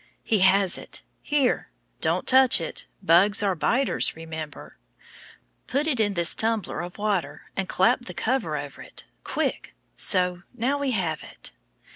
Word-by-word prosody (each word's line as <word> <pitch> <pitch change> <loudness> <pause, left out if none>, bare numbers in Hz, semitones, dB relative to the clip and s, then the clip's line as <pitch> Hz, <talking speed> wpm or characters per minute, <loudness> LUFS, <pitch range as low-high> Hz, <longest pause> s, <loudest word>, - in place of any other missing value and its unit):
He 215 - +1
has 190 0 +4
it! - - -8 0.2
Here, 290 -4 0 0.3
don't - - +1
touch 260 -3 +6
it, 165 - -6 0.2
bugs 195 +6 +4
are 195 -2 +2
biters, 245 - 0
remember. 160 -2 -8 0.9
Put 280 +5 0
it 285 -7 0
in 205 -2 +1
this 170 -2 +2
tumbler 220 -7 -1
of 175 0 -8
water, 195 -8 -2
and 195 -1 -2
clap 245 +6 +2
the - - -7
cover 220 - -1
over 145 -1 -7
it - - -10 0.2
quick - - -3 0.2
so! 180 -1 +2
now 260 +4 0
we 280 -1 0
have 180 -10 -1
it. - - -8
195 Hz, 150 wpm, -25 LUFS, 170-245 Hz, 0.9 s, touch